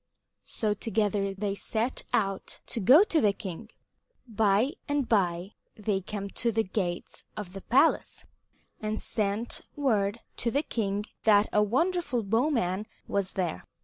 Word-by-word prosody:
So 215 -2 0
together 205 -2 0
they 195 +1 -2
set 225 +4 -2
out 195 -3 -1
to - - -1
go 260 - +8
to 335 -6 +1
the 205 -2 +4
king. 200 +1 -7 0.6
By 220 +3 +2
and 290 -3 0
by 180 -3 +1 0.2
they 205 -2 -1
came 200 +1 -5
to 235 - 0
the 225 0 +1
gates 185 -3 -3
of 195 -4 -6
the 195 - -7
palace, 275 - +2 0.5
and 215 0 -2
sent 215 +2 -1
word 220 -7 +1 0.2
to 235 - 0
the 280 +5 +1
king 205 -5 -2 0.2
that 210 -1 +5
a 210 - +5
wonderful 275 - +1
bowman 215 - +1 0.2
was 200 -2 -1
there. 175 - -2
210 Hz, 145 wpm, -28 LUFS, 195-235 Hz, 0.6 s, go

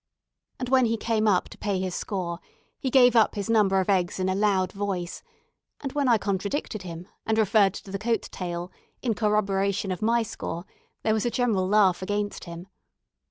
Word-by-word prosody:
And 250 - -4
when 260 -1 +5
he 230 0 0
came 220 0 0
up 185 -4 +3
to - - -13
pay 200 -3 -1
his 185 -1 -2
score, 175 -4 -3 0.4
he 265 - -1
gave 250 -2 +6
up 225 -2 +4
his 205 +2 -2
number 200 -4 +4
of 190 - -1
eggs 185 -2 +1
in 185 0 0
a - - +1
loud 190 -2 +1
voice; 195 -3 -3 0.6
and 275 - -4
when 285 -1 0
I 235 -2 +5
contradicted 200 +3 -2
him, 175 0 -8 0.2
and 220 0 0
referred 205 -2 +4
to 195 - -9
the 195 - -3
coat 225 0 0
tale 175 0 -5 0.3
in 240 -3 +1
corroboration 200 -2 0
of 180 - -4
my 230 +2 +2
score, 175 -4 -6 0.4
there 220 - +2
was 220 +2 0
a - - +2
general 230 -7 +1
laugh 195 -3 +4
against 205 +2 -3
him. 170 +1 -8
205 Hz, 195 wpm, -26 LUFS, 185-225 Hz, 0.6 s, gave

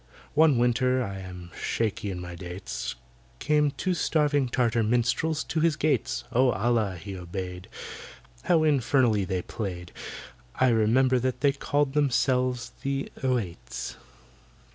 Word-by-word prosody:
One 150 -3 +5
winter—I 120 -3 +1
am 90 -2 -9
shaky 110 -2 -1
in 90 -2 -4
my 90 0 -7
dates— 90 +2 -5 0.4
Came 150 -1 +2
two 185 +6 -1
starving 145 -5 +2
Tartar 120 -2 +2
minstrels 125 +8 +1
to 160 - -2
his 160 -1 +3
gates; 150 0 0
Oh, 125 +2 +4
ALLAH 105 -2 +1
be 100 -2 -5
obeyed, 90 0 -6 0.8
How 170 -3 +4
infernally 130 -7 +3
they 95 -2 -2
played! 90 -5 -5 0.6
I 130 - +4
remember 125 +3 +3
that 130 +1 -2
they 140 - +5
called 145 0 0
themselves 130 -3 +1
the 135 0 -2
"Oüaits." 95 - -3
125 Hz, 125 wpm, -27 LUFS, 95-140 Hz, 0.8 s, One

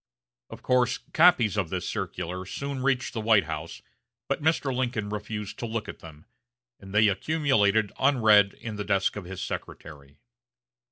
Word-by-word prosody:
Of - - -11
course 125 -1 +2 0.2
copies 140 - +4
of 95 -6 0
this 90 0 -3
circular 90 -2 -4
soon 140 +5 -5
reached 130 -1 0
the 115 - -3
White 110 -2 +4
House, 80 -2 -7 0.4
but - - -2
Mr. 145 -4 +1
Lincoln 120 -5 -2
refused 105 0 -5
to 120 - -3
look 115 -1 -4
at - - -8
them, 80 -2 -13 0.5
and 95 -1 -12
they 105 +1 +4
accumulated 110 -4 +1
unread 110 -7 +4
in 110 -3 -7
the 105 - -3
desk 100 -1 0
of 105 -3 -6
his 95 +1 -6
secretary. 70 -1 -8
105 Hz, 160 wpm, -26 LUFS, 95-125 Hz, 0.5 s, copies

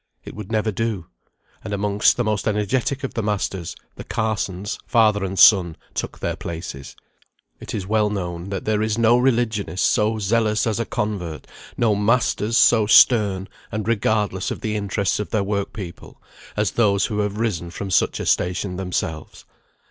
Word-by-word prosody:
It - - -8
would 105 0 -8
never 110 0 +1
do. 110 -4 -2 0.6
And 100 - -3
amongst 100 +1 +2
the 120 - +1
most 105 -2 -1
energetic 110 +6 0
of 135 - -4
the 115 - -2
masters, 100 -4 -2 0.2
the - - -7
Carsons, 105 -3 -3
father 110 -4 +3
and 95 0 -3
son, 90 -4 +6 0.2
took - - -4
their - - -3
places. 80 -5 -7 0.6
It - - -6
is 100 -3 -3
well 105 +1 +1
known, 90 -2 -4
that 95 -2 -4
there 105 -1 +1
is 110 0 0
no 115 +1 +4
religionist 115 -7 0
so 110 +1 +2
zealous 110 +1 +1
as 110 -1 -1
a 115 - -1
convert; 90 -7 -3 0.3
no 115 -3 +3
masters 110 +1 +1
so 110 -3 +5
stern, 100 -4 +5 0.2
and 105 0 -3
regardless 105 -4 0
of - - -5
the 110 -1 -2
interests 100 -1 -1
of 105 - -4
their 110 -3 0
work 100 0 -2
people, 95 -5 -9 0.4
as 105 -1 +1
those 100 -4 +2
who 105 -2 -3
have 105 0 -1
risen 105 -7 -2
from 95 +2 -6
such - - +2
a - - -3
station 90 +1 0
themselves. 90 -4 -4
105 Hz, 170 wpm, -22 LUFS, 95-110 Hz, 0.6 s, son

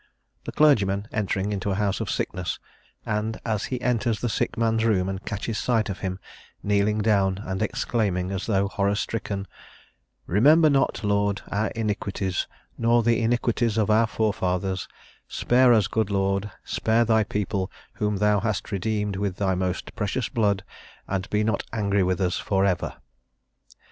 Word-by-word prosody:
The - - -4
clergyman 105 -9 +3
entering 100 -1 -1
into 100 0 -2
a 95 - 0
house 100 -1 0
of - - -3
sickness, 90 -1 -2 0.5
and 110 +1 -2
as 110 -3 -1
he 125 - -3
enters 120 -3 0
the 120 - -1
sick 110 +3 -1
man's 115 -1 +1
room 100 -5 +2
and 95 0 -4
catches 105 +1 -3
sight 115 -4 +1
of 95 - -6
him, 95 -1 -3 0.5
kneeling 105 +1 +2
down 100 -3 +2
and 95 +1 -3
exclaiming, 105 -5 -1
as 95 -1 -3
though 100 -3 +2
horror 100 0 0
stricken: 100 -2 -3 0.8
"Remember 150 - +5
not, 135 -4 +1
Lord, 100 0 +1
our 105 +2 +1
iniquities, 100 -4 -2 0.3
nor 115 0 +3
the 120 +1 +2
iniquities 115 -1 +1
of 110 -1 +2
our 110 +1 +4
forefathers; 95 -4 -1 0.4
spare 125 +1 +3
us, 110 -4 +5
good 110 -2 0
Lord, 100 +1 0
spare 115 +1 +1
Thy 110 -1 +3
people 100 -2 -2 0.3
whom 105 -1 0
Thou 105 0 +3
hast 105 -3 -2
redeemed 105 0 -1
with 100 -2 -2
Thy 95 0 0
most 90 0 -3
precious 110 +3 -2
blood, 100 -4 +1 0.4
and 95 -1 -2
be 105 0 +1
not 110 -2 0
angry 100 -3 +1
with 90 -1 +1
us 90 -2 0
for 95 -2 +1
ever." 95 -3 -1
105 Hz, 160 wpm, -25 LUFS, 95-110 Hz, 0.8 s, Remember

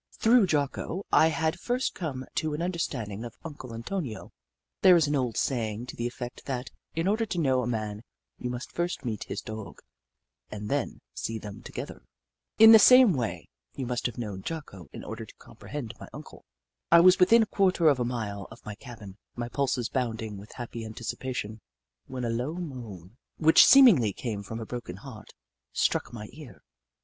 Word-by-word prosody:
Through 225 -2 +5
Jocko 155 +4 -1
I 160 - +6
had 160 0 -1
first 250 +1 -1
come 135 -7 -5
to 155 -1 -1
an 155 - -4
un 180 - 0
derstanding 115 - -4
of 120 - -9
Uncle 145 -6 -8
Antonio. 115 - -5 0.5
There 185 -2 +8
is 165 -3 +4
an 145 0 0
old 125 -4 -1
saying 115 -3 -1
to - - -8
the 120 - -2
effect 120 0 -8
that, 130 -2 -4 0.2
in 165 +2 0
order 215 +3 +2
to 185 - -4
know 135 -6 +2
a 120 - -3
man, 110 -3 -3 0.4
you 125 - -3
must 125 0 -6
first 175 -4 -3
meet 110 -4 -3
his 100 - -5
Dog, 110 -2 -8 0.7
and 105 0 -6
then - - -2
see 115 - -4
them 105 -2 -9
together. - - -7 0.6
In 220 0 +10
the 220 - +10
same 250 -1 +8
way, 110 - -3 0.3
you 135 - -4
must 120 0 -1
have 120 - -8
known 105 -5 -5
Jocko 100 - -7
in - - -9
order - - -6
to - - -14
compre - - -15
hend 130 -6 -5
my - - -9
Uncle. - - -11 0.5
I 170 - +9
was 180 +2 +7
within 225 +5 +6
a 215 - -8
quarter 185 -4 +3
of 140 -4 +4
a - - +1
mile 110 -5 -4
of 115 +1 -15
my 105 - -5
cabin, 105 -4 -11 0.2
my 120 0 -4
pulses 130 -3 0
bounding 115 -4 -3
with 100 +2 -11
happy 120 -2 -6
anticipation, 110 0 -5 0.5
when 125 -2 -4
a - - -1
low 125 +8 -2
moan, 120 - -8 0.2
which 160 +1 +7
seemingly 200 - +7
came 110 -3 -4
from 110 +3 -7
a 115 - -5
broken 120 -6 -6
heart, 110 +1 -12 0.4
struck - - 0
my 105 -3 -7
ear. 135 -7 -13
125 Hz, 190 wpm, -28 LUFS, 110-160 Hz, 0.7 s, In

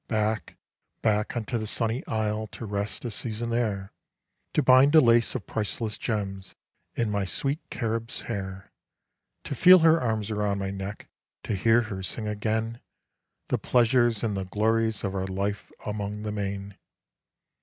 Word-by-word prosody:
Back, 110 -4 -1 0.5
back 105 +2 +1
unto 115 +1 -2
the 110 - -4
sunny 115 +3 0
isle 110 0 -1
to 115 - -6
rest 100 +2 -3
a 120 - -2
season 115 +2 -2
there 105 -5 -1 0.6
To 150 - +3
bind 130 +4 +6
a - - +10
lace 115 -3 +4
of 125 - -4
priceless 110 0 -2
gems 100 -4 -3 0.4
in 115 -3 0
my 100 -1 0
sweet 140 - -2
Carib's 115 +1 -3
hair, 95 -3 -5 0.7
To - - -4
feel 180 +8 +8
her 165 0 +6
arms 110 -3 -1
about 105 -1 0
my 95 0 -2
neck, 100 +1 -6 0.4
to - - -2
hear 115 +5 +4
her 105 -4 -5
sing 105 +3 -3
again 110 +2 -2 0.7
The - - +1
pleasures 120 -2 +3
and 110 -3 0
the 95 -1 -2
glories 110 +2 +1
of 95 -2 -2
our 95 -1 -2
life 100 +2 -3
along 105 0 -4
the 105 - -3
main. 100 -1 -4
110 Hz, 155 wpm, -27 LUFS, 100-115 Hz, 0.7 s, a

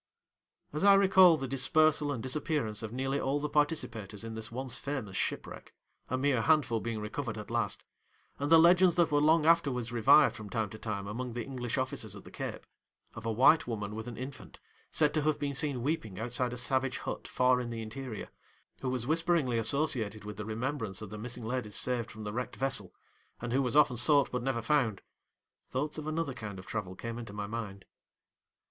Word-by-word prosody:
As 150 - -2
I 200 0 +8
recall 190 -3 +6
the 135 - -4
dispersal 150 +3 +2
and 125 -5 -4
disappearance 130 -5 -1
of 110 -1 -5
nearly 135 +3 -1
all 140 +2 0
the 150 - -2
participators 120 -9 -1
in 115 0 -6
this 110 0 -6
once 130 +1 -3
famous 135 -9 -4
shipwreck - - -4 0.3
(a 130 - 0
mere 130 -3 +2
handful 120 -3 +3
being 115 -1 -3
recovered 110 +2 -4
at 105 +1 -8
last), 115 -4 0 0.6
and 145 +2 -2
the 165 - +9
legends 175 +2 +6
that 170 -3 +3
were 145 0 +3
long 155 +1 +4
afterwards 140 -8 +2
revived 120 +5 +5
from 110 -2 -8
time 110 -2 -2
to 110 - -9
time 105 -3 -4
among 120 +4 -4
the 120 0 -3
English 125 -1 -4
officers 125 -5 -3
at 100 - -11
the - - -13
Cape, - - -6 0.5
of 110 +1 -7
a - - +1
white 135 +8 +5
woman 105 -3 -4
with 110 +2 -6
an 120 - -7
infant, 130 +2 -8 0.3
said 150 -2 +2
to 155 - +1
have 155 0 +1
been 145 -1 -2
seen 135 -2 0
weeping 125 - -2
outside 120 +2 -1
a 125 - -5
savage 130 +1 0
hut - - -5
far 125 0 +3
in 120 - -5
the 115 -1 -4
interior, 120 0 -7 0.5
who 130 - -2
was 125 -2 -1
whisperingly 160 -5 +1
associated 115 -4 +1
with 105 - -6
the 105 +1 -6
remembrance 110 -2 -3
of 105 - -9
the 105 - -6
missing 120 +1 -6
ladies 110 -3 -3
saved 120 -1 +1
from 110 0 -9
the 105 0 -5
wrecked 125 +2 -4
vessel, 135 -9 -1 0.5
and 120 0 -4
who 135 - +3
was 125 0 -1
often 145 -4 +5
sought 140 +3 +4
but 125 - -2
never 120 -2 -1
found, 115 -6 +1 0.7
thoughts 150 +4 -2
of 155 - -6
another 155 -3 -2
kind 110 -5 -7
of 95 - -10
travel 95 -4 -4
came 115 +3 -6
into 115 -4 -8
my 105 0 -4
mind. 100 -3 -6
125 Hz, 205 wpm, -31 LUFS, 110-145 Hz, 0.7 s, the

